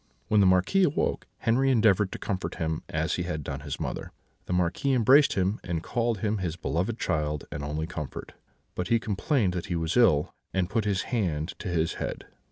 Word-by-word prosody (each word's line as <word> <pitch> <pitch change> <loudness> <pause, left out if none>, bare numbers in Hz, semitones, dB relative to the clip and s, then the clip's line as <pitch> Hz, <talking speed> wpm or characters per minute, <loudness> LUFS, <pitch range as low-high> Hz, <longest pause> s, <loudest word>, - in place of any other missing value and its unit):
"When 105 - +4
the 100 - +6
Marquis 95 - +3
awoke, 150 -5 0
Henri 130 +4 +3
endeavoured 105 -5 +4
to - - -5
comfort 95 -2 -3
him, 80 -1 -2
as 80 +1 -1
he - - -1
had 85 -4 -3
done 70 -1 -4
his 70 - -6
mother; - - -4 0.4
the - - -5
Marquis 90 +10 +1
embraced 130 +4 +5
him, 95 +3 0
and 85 -2 -3
called 115 -4 -1
him 105 -1 0
his 85 -3 -2
beloved 90 +5 -2
child 75 -6 -1
and 75 - -5
only 75 +2 -2
comfort, 75 -4 -6 0.4
but 90 - -3
he 115 - +4
complained 105 - 0
that 90 +3 -4
he 90 - -2
was 80 0 -1
ill, 95 -12 +4 0.2
and 95 -1 0
put 110 -2 0
his 100 -2 0
hand 85 -8 0
to - - -6
his 85 -2 0
head. - - -4
95 Hz, 200 wpm, -27 LUFS, 80-110 Hz, 0.4 s, the